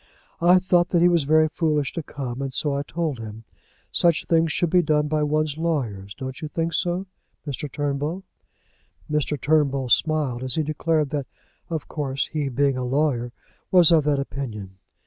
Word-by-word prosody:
I 175 +2 +6
thought 180 -2 +2
that 175 - +2
he - - +7
was 170 -5 +2
very 155 +2 +4
foolish 155 -2 0
to 165 - -3
come, 135 -4 -6
and 135 -1 -3
so 145 +2 0
I 140 - -1
told 155 -3 -3
him. 110 0 -8 0.5
Such 170 -2 +2
things 165 -1 +2
should 170 -1 0
be 180 - +5
done 150 -2 +1
by 155 0 0
one's 155 0 0
lawyers. 115 -12 -2
Don't 130 0 -7
you 155 - -3
think 165 +2 -2
so, 180 +2 0 0.4
Mr. 145 0 -5
Turnbull?" 145 +6 -2 0.9
Mr. 150 -1 0
Turnbull 140 -3 +1
smiled 150 -4 +2
as 130 -1 -2
he 160 - +1
declared 155 0 0
that, 145 -3 -2 0.4
of 160 -3 -4
course, 140 -3 -2
he, 150 -3 -3
being 135 +1 +1
a 130 - -2
lawyer, 125 -2 0 0.4
was 180 -2 +6
of 160 -3 +5
that 145 -1 +2
opinion. 110 -9 -5
150 Hz, 180 wpm, -24 LUFS, 135-160 Hz, 0.9 s, he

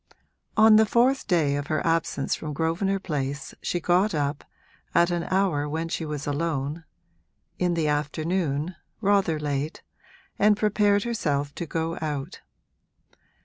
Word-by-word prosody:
On 215 0 +8
the 220 - +6
fourth 255 +5 +2
day 160 -7 +2
of 145 0 -3
her 155 -1 -1
absence 165 -4 0
from 155 -2 -4
Grosvenor 165 +6 0
Place 140 -6 -4
she 175 - -1
got 180 +3 +2
up, 145 0 -1 0.5
at 170 +1 +4
an 175 -1 -1
hour 185 -7 +1
when 160 +2 -3
she 165 - -3
was 150 -1 -4
alone 150 +1 -2 0.7
(in 180 -1 +1
the 160 -2 +1
afternoon, 155 +2 -1 0.2
rather 200 -6 +2
late), 145 +1 -3 0.6
and 210 0 +5
prepared 205 -1 +2
herself 145 -12 -1
to 170 - -5
go 165 +1 -2
out. 145 -3 -4
165 Hz, 140 wpm, -26 LUFS, 145-190 Hz, 0.7 s, On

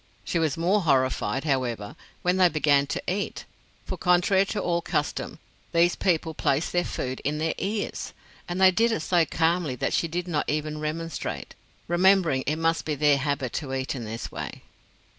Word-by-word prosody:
She 170 - -1
was 160 -3 0
more 185 +5 +2
horrified, 135 -3 +1
however, 125 -8 -1 0.3
when 180 +1 +2
they 185 -1 +6
began 145 -3 +3
to - - -3
eat; 195 +2 -2 0.4
for, - - -4
contrary 185 +2 +3
to 210 - -2
all 170 -3 0
custom, - - -2 0.4
these 170 +1 +4
people 165 -3 0
placed 145 +1 0
their 175 0 +2
food 130 -5 -4
in 150 +2 -2
their 160 +1 0
ears. 205 +1 -3 0.4
And 175 +1 -2
they 190 0 +7
did 230 +5 +2
it 225 - -1
so 170 +1 +3
calmly 165 -3 0
that - - -2
she 165 - +1
did 175 +2 -3
not 155 -4 -1
even 150 0 -2
remonstrate, 155 +1 -4 0.3
remembering 175 -5 +4
it 150 - +1
must 165 +1 +1
be 150 - -2
their 145 0 +3
habit 140 -3 -2
to 135 -3 -4
eat 130 0 -2
in 125 -4 -5
this 115 +1 -6
way. - - -7
160 Hz, 180 wpm, -26 LUFS, 140-180 Hz, 0.4 s, they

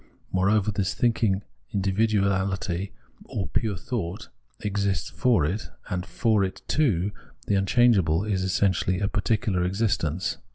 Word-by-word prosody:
Moreover, 100 +2 +2
this 100 0 -1
thinking 110 -5 +1 0.3
individuahty, 100 -2 +1 0.4
or 100 - -4
pure 100 +5 -1
thought, 95 0 -4 0.3
exists 100 -5 -1
for 90 0 +2
it, 95 +8 -3 0.2
and 90 0 -2
for 110 -4 +2
it 95 -1 -4
too 105 - +2 0.3
the - - 0
unchangeable 95 -4 +3
is 100 -3 -1
essentially 95 -1 +1
a 100 - +1
particular 105 -2 0
existence. 95 -4 0
100 Hz, 120 wpm, -26 LUFS, 95-110 Hz, 0.4 s, unchangeable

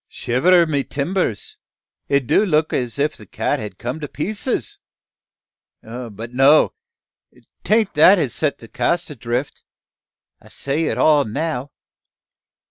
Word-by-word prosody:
"Shiver 170 +9 +2
my 145 -3 0
timbers! 140 - -3 0.5
it 140 -2 +1
do 200 - +3
look 155 -5 +1
like - - +1
as 120 +1 -6
if 150 +2 0
the - - -14
Cat 145 - -2
had 105 -4 -7
come 125 +6 -5
to 150 - -5
pieces. 205 - -3 1.0
But 115 -1 -8
no! 135 +4 +5 0.9
Tain't 215 -1 +2
that 180 +7 +7
has 140 -9 -1
set 150 -2 0
the 115 - -13
cask 160 +8 -1
adrift. 125 +1 -4 0.8
I - - -18
set 140 +2 -3
it 165 - -1
all 150 -2 +4
now. 145 +3 -3
145 Hz, 135 wpm, -20 LUFS, 125-160 Hz, 1.0 s, that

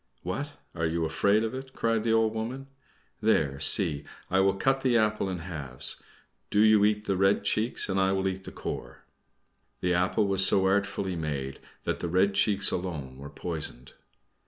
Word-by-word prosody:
"What! 145 +12 -4 0.2
are 80 -1 -1
you 80 0 -1
afraid 100 +7 +2
of 115 +1 -2
it?" 130 0 -7
cried 115 -1 0
the 115 - +1
old 110 -1 +3
woman. 120 +5 -4 0.6
"There, 80 -11 +2
see 75 -1 +3 0.3
I 95 - +3
will 95 0 +3
cut 135 +7 +1
the 125 -3 +3
apple 105 -3 +1
in 90 - -3
halves; 75 -7 -3 0.5
do 105 - +3
you 110 -1 +6
eat 105 0 +1
the 100 - 0
red 95 +2 +2
cheeks, 110 +3 0
and 95 -1 0
I 95 0 +3
will 95 0 0
eat 95 0 -4
the - - -7
core." - - -7 0.8
(The 90 0 +1
apple 90 +4 +2
was 95 -1 +2
so 95 0 +3
artfully 95 -1 0
made 70 -5 -4 0.2
that - - -2
the 85 - -3
red 95 +3 +3
cheeks 100 0 +2
alone 75 -8 -4
were 70 +1 -8
poisoned.) 80 -8 -5
95 Hz, 180 wpm, -28 LUFS, 85-110 Hz, 0.8 s, you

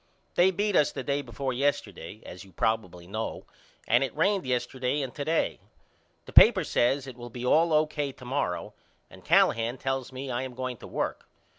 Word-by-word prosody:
They 180 +2 +5
beat 200 +2 0
us 150 - +4
the 135 - -5
day 140 +2 0
before 130 +1 -4
yesterday 110 - -2
as 90 0 -9
you 95 - -17
probibly 90 -4 -1
know 110 +4 -4 0.4
and 120 +4 +4
it 135 - -4
rained 195 -1 +1
yesterday 130 +2 -1
and 130 - -6
to 145 - -4
day. 160 +2 0 0.7
The - - -12
papers 195 -8 +7
says 135 +3 +2
it 130 -2 -9
will 120 0 -8
be 120 +1 -6
all 165 +6 +4
O.K. 150 -2 +1
to 125 - -14
morrow 125 -9 -2 0.4
and - - -14
Callahan 115 +3 +3
tells 135 -1 -3
me 130 +1 -6
I 120 +1 -1
am 130 -2 -6
going 130 -1 -4
to - - -11
work. - - -3
130 Hz, 190 wpm, -28 LUFS, 120-145 Hz, 0.7 s, papers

